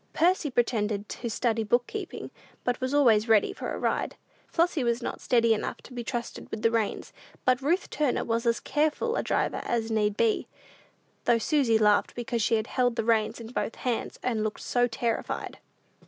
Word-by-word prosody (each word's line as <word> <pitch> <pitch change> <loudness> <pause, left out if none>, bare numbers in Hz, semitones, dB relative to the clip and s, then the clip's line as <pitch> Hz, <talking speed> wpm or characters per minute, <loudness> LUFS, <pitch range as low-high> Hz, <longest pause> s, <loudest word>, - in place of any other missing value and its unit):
Percy 345 -2 +2
pretended 215 -4 0
to 235 - -4
study 225 0 0
book 240 +3 +2
keeping, - - -6 0.3
but 245 0 -1
was 255 0 -1
always 230 -6 +4
ready 220 -2 +4
for - - -5
a - - -3
ride. - - -1 0.3
Flossy 335 -4 +1
was 235 0 0
not - - -4
steady 230 -2 +3
enough 215 - -3
to - - -12
be 240 -1 -4
trusted 235 0 -5
with 220 - -6
the 230 - +4
reins, 225 -3 -1 0.3
but 255 0 +3
Ruth 335 +7 +1
Turner 295 -5 +1
was 230 +1 0
as 230 - +2
careful 310 +11 0
a - - +1
driver - - 0
as 230 -1 -1
need 210 -1 +1
be; 230 -2 +2 0.8
though 235 - +4
Susy 245 -2 +2
laughed 210 -1 +3
because 240 -1 -2
she 225 +1 +3
held 245 -2 +1
the 225 -2 -1
reins 225 0 +2
in 225 -1 -8
both 240 - -2
hands, 245 -3 -2
and 225 -4 0
looked 215 -1 -3
so 245 0 +2
terrified. 230 0 -3
235 Hz, 185 wpm, -28 LUFS, 225-255 Hz, 0.8 s, always